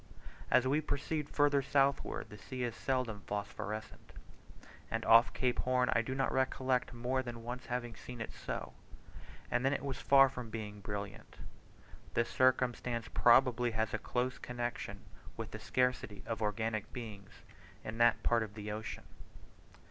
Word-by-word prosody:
As 130 0 +4
we 145 +4 +2
proceed 150 0 -2
further 145 -1 +3
southward 135 -4 +1
the 105 - -9
sea 125 +5 -5
is 120 -2 -2
seldom 125 -6 -1
phosphorescent; 105 +1 -5 0.8
and - - -2
off 115 +1 +7
Cape 125 -2 0
Horn 125 0 +2
I 115 - +3
do 130 +3 -4
not 135 0 +1
recollect 130 -1 +1
more 125 +2 -1
than 120 -2 -7
once 125 +1 -6
having 120 -2 -3
seen 125 +2 -9
it 115 - -4
so, - - -5 0.8
and 120 +1 +1
then 135 +1 +3
it 140 - -2
was 135 -2 -3
far 135 -1 +7
from 125 -3 -6
being 105 -2 -6
brilliant. 100 0 -6 0.8
This 120 0 +2
circumstance 125 -2 +1
probably 125 0 +5
has 110 0 0
a 110 - 0
close 125 +4 -1
connection 120 -1 -4 0.4
with - - -5
the - - -6
scarcity 125 -5 0
of 115 -1 -3
organic 110 0 -1
beings 105 -5 -9 0.4
in 110 +1 -6
that 120 -1 +4
part 120 -1 +3
of 105 -2 -5
the 105 -1 -5
ocean. 110 +1 -5
120 Hz, 155 wpm, -34 LUFS, 110-130 Hz, 0.8 s, off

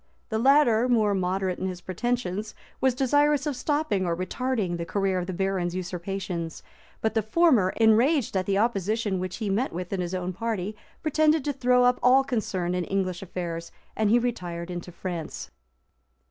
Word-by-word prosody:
The 220 - -1
latter, 255 -2 +4
more 215 -4 +3
moderate 185 0 -1
in 190 - -2
his 180 -1 -5
pretensions, 215 +1 -3 0.2
was 260 -2 +2
desirous 290 +2 +2
of 295 -3 -1
stopping 290 -7 0
or 170 -2 -1
retarding 200 -1 -1
the 170 - -3
career 190 +1 0
of 180 - -4
the - - -2
barons' 185 -1 -1
usurpations; 180 -2 -4 0.4
but 220 - 0
the 220 - +2
former, 225 - +3
enraged 230 +4 +3
at 185 -1 0
the 195 -1 +2
opposition 210 -2 0
which, 185 0 -4
he 220 - -4
met 210 +7 0
with 180 +2 -5
in 190 - -1
his 175 +1 -3
own 180 0 -3
party, 210 0 -3 0.3
pretended 310 -1 +2
to 290 - 0
throw 250 -1 +3
up 250 0 +3
all 260 +2 +5
concern 195 -9 -2
in 180 0 0
English 185 -2 -2
affairs; 170 -3 -5 0.2
and 215 -1 +1
he 230 - +5
retired 180 -8 -3
into 175 0 -6
France. 170 -2 -6
200 Hz, 175 wpm, -26 LUFS, 180-245 Hz, 0.4 s, all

